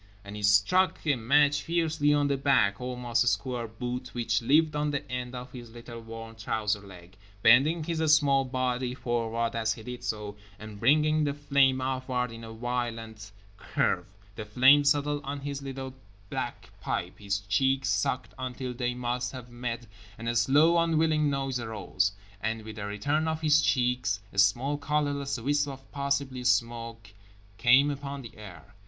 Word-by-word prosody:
_" - - -29 0.2
And 100 +1 -9
he 105 - -6
struck 105 - +4
a 145 -3 +3
match 145 +5 +3
fiercely 160 -3 +1
on 145 -1 +3
the 140 - +1
black, 130 -8 +2
almost 125 -1 0
square 125 -1 -1
boot 125 +3 -6
which 115 -2 0
lived 150 +5 +3
on 150 0 0
the 145 0 -3
end 125 0 -4
of 125 0 -7
his 120 -2 -10
little 115 0 -10
worn 115 0 -9
trouser 105 -1 -1
leg, 90 -2 -14 0.3
bending 140 +8 +5
his 165 0 -2 0.2
small 140 -3 +3
body 125 -1 -2
forward 115 -1 -2
as 110 -1 +1
he 115 - -11
did 125 +1 -7
so, 105 -3 -4 0.2
and 110 -1 -10
bringing 155 +5 +3
the 145 -1 -1
flame 140 -2 +2
upward 130 -1 -2
in 115 0 -9
a 115 - -8
violent 115 -2 -4 0.3
curve. 90 -2 -1 0.3
The 110 - -6
flame 130 +7 +5
settled 145 0 +1
on 140 +1 -5
his 140 0 -4
little 135 -1 -6 0.4
black - - -5
pipe, 90 - -3
his 100 -1 -1
cheeks 130 +7 +1
sucked 105 +5 -1
until 130 0 -4
they 125 0 -2
must 125 0 -2
have 125 -2 -9
met, 120 -1 -4 0.3
and 115 - -6
a 120 - 0
slow 155 +8 +4
unwilling 160 -2 +2
noise 135 -2 -1
arose, 105 -3 -1 0.3
and 110 +1 -2
with 110 0 -9
the 100 -1 -4
return 145 +10 -1
of 160 0 -2
his 155 0 +4
cheeks 125 -6 +1
a 100 - -1
small 120 +9 +3
colorless 145 -2 -1
wisp 145 +4 +1
of 135 -1 -9
possibly 140 -2 -2
smoke 115 -2 -1 0.5
came 130 +5 +5
upon 140 -1 -6
the 115 - -11
air. 100 -2 -12
125 Hz, 170 wpm, -28 LUFS, 115-140 Hz, 0.5 s, bending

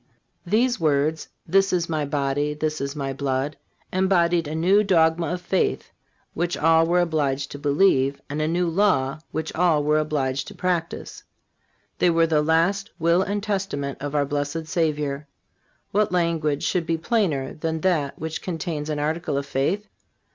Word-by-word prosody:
These 240 +6 +2
words: 155 0 +1 0.2
"This 195 +1 +3
is 175 -2 0
My 155 -3 -1
body; 145 +1 -1
this 155 0 -2
is 140 +1 -3
My 135 -2 -3
blood," 135 +1 -2 0.4
embodied 175 -3 +2
a 155 - -4
new 190 +6 +4
dogma 165 -3 +3
of 180 0 -3
faith 190 +1 -1 0.4
which 175 +1 -1
all 165 +1 +4
were 175 +1 +3
obliged 145 -5 -1
to 145 - -7
believe, 140 -2 +2
and 145 +2 -3
a 155 - +1
new 175 +2 +1
law 165 -7 +1
which 160 0 -4
all 165 -3 +2
were 150 +1 +3
obliged 140 -3 -1
to - - -10
practice. 175 -2 -3 0.8
They 180 - +4
were 165 -1 +4
the 155 -2 +2
last 170 +7 +1
will 170 +1 +3
and 200 +1 -2
testament 190 -10 -2
of 145 +1 -4
our 145 -1 +2
blessed 145 +3 -3
Savior. 150 -3 -1 0.6
What 210 -1 +2
language 165 -5 0
should 175 -3 0
be 165 - +1
plainer 160 - 0
than 160 0 -3
that 155 -6 0
which 160 +1 -5
contains 160 -3 -4
an 150 - -1
article 155 0 -1
of 140 - -2
faith? 165 +10 -1
160 Hz, 165 wpm, -24 LUFS, 145-175 Hz, 0.8 s, new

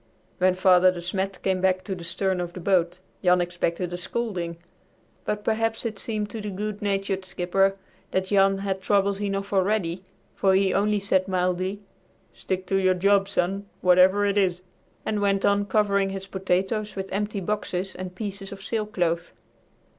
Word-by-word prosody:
When 185 0 +4
Father 185 0 +5
De 180 - -6
Smet 190 +2 -3
came 190 -1 +1
back 185 0 +2
to 195 - -4
the 180 -2 -7
stern 185 +2 -1
of 175 0 -5
the 185 - -7
boat, 180 -1 +1 0.2
Jan 180 0 +5
expected 175 0 -2
a - - -2
scolding, 180 -4 -3 0.7
but 210 0 -2
perhaps 225 +1 0
it 215 -3 -3
seemed 215 -2 -3
to 225 - -5
the 210 - -4
good 205 +2 -4
natured 195 -1 -1
skipper 190 +1 +1 0.3
that 190 0 0
Jan 195 0 +3
had 195 -1 -2
troubles 200 0 +1
enough 200 0 -2
already, 190 -2 +1 0.3
for 190 -1 +3
he 190 -1 +3
only 210 +1 +2
said 190 -1 +1
mildly, 185 +1 -1 0.5
"Stick 185 0 -3
to 195 +1 +1
your 185 -1 +3
job, 195 +1 +3
son, 195 +1 -1
whatever 185 +3 +5
it 200 0 +2
is," 180 -2 0 0.4
and 215 -1 0
went 195 -1 +2
on 200 0 +2
covering 200 -1 +2
his 195 0 -5
potatoes 190 +3 -1
with 195 0 -5
empty 205 +1 -2
boxes 190 -1 -1
and 185 0 -7
pieces 200 -1 -5
of 195 0 -9
sailcloth. 190 -6 -1
195 Hz, 170 wpm, -25 LUFS, 185-200 Hz, 0.7 s, Father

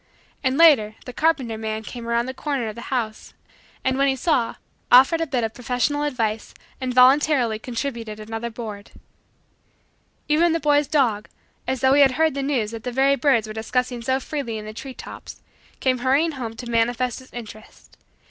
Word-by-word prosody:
And, 260 0 +1
later, 270 -11 +5
the 250 - -8
carpenter 265 -8 0
man 220 0 -4
came 235 +1 -8
around 235 0 +1
the 260 - -5
corner 275 -4 -2
of - - -6
the 235 - -9
house 225 -5 -3 0.5
and, 260 0 0
when 275 - +4
he 270 - +2
saw, 260 -3 0 0.4
offered 270 +7 +6
a 330 - -1
bit 255 -4 -1
of 225 0 -2
professional 250 +5 -1
advice 230 -7 -2 0.3
and 255 -1 -2
voluntarily 255 -2 +4
contributed 230 -3 -5
another 225 +2 -5
board. 220 -3 -8 1.4
Even 320 +3 +3
the 330 - 0
boy's 290 -2 +2
dog, 245 -8 +1 0.4
as 260 -2 -2
though 265 0 +4
he 285 - +5
had 270 -2 +5
heard 315 +2 +2
the 275 - -3
news 260 -6 -1
that 225 -1 -7
the 250 - -3
very 270 +3 +3
birds 270 -6 +2
were 215 - -7
discussing 245 +2 -2
so 260 +3 0
freely 265 -5 -4
in 215 - -7
the 215 - -7
tree 260 +3 -8
tops, - - -10 0.4
came 255 -1 +1
hurrying 275 +6 +2
home 240 -6 -6
to 240 +2 -8
manifest 240 +2 0
his 260 - -16
interest. 215 -2 -11
250 Hz, 185 wpm, -23 LUFS, 225-275 Hz, 1.4 s, offered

